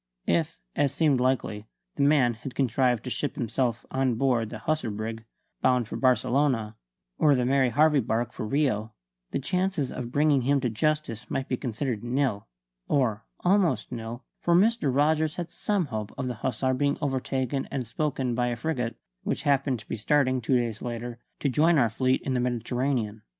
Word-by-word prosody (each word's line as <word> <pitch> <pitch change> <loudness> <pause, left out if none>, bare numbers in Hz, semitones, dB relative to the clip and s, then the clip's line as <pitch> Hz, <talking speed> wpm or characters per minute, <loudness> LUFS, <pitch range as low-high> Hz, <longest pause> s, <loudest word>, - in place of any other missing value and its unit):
If, 85 -1 +1 0.2
as 140 -2 +2
seemed 150 -5 +2
likely, 120 -4 0 0.3
the - - -2
man 140 -4 +4
had 125 +3 -8
contrived 125 -2 +2
to 125 - -5
ship 145 - -2
himself 120 -1 -1
on 130 -2 +1
board 120 -3 +1
the 110 - -6
Hussar 150 +2 -1
brig, 110 +2 -5 0.4
bound 125 -3 +3
for - - -6
Barcelona, 125 -2 +2 0.4
or 145 -2 +5
the 125 -1 +1
Mary 130 0 +3
Harvey 150 +4 +4
barque, 120 0 -1
for 110 - -4
Rio, 110 -5 0 0.3
the - - -2
chances 180 -1 -1
of 120 -1 -5
bringing 145 -1 +3
him 140 +3 +2
to 125 -3 0
justice 150 -1 -1
might 135 - -2
be 125 - 0
considered 120 -2 -3
nil, 125 -4 -1 0.4
or 115 -7 +1 0.2
almost 175 - +2
nil; 115 +2 -6 0.2
for 170 - +2
Mr. 210 - +3
Rogers 155 +3 +2
had 175 -2 -5
some 205 -4 0
hope 110 -5 -4
of 130 - -2
the 125 - -2
Hussar 130 +2 0
being 140 +2 +1
overtaken 135 -1 -1
and 130 -3 -3
spoken 130 0 -1
by 120 +1 +1
a 120 - -1
frigate 120 -3 -2 0.3
which - - -2
happened 135 -2 +2
to - - -18
be - - -3
starting, 130 +3 +2
two 125 +3 +2
days 115 -3 -2
later, 120 0 -5 0.2
to - - +1
join 155 +5 +4
our 120 -5 +3
fleet 130 +3 +1
in 135 - -1
the 125 - +1
Mediterranean. 120 -2 -1
130 Hz, 180 wpm, -27 LUFS, 115-145 Hz, 0.4 s, or